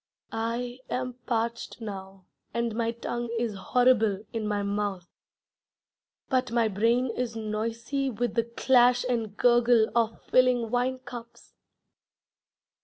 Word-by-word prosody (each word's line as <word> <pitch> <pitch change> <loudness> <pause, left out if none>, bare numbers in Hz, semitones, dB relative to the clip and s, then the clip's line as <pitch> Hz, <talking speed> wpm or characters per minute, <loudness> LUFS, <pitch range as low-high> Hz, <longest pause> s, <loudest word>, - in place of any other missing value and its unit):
I 235 +2 -3
am 255 0 -2
parched 235 0 -2
now, 195 -3 -8 0.3
and 235 -1 0
my 230 0 0
tongue 240 0 -4
is 230 -2 -1
horrible 220 0 +2
in 220 -2 -2
my 205 -1 0
mouth, 200 -3 -2 1.2
But 255 -3 0
my 235 -1 +3
brain 230 +5 +2
is 235 -1 -3
noisy 230 +5 -2
With 240 0 -2
the 230 -1 +1
clash 245 +1 +4
and 225 -4 -2
gurgle 240 -2 +4
of 230 -1 +1
filling 250 -3 +3
wine 250 +1 +1
cups. 240 -2 -11
235 Hz, 120 wpm, -27 LUFS, 220-245 Hz, 1.2 s, clash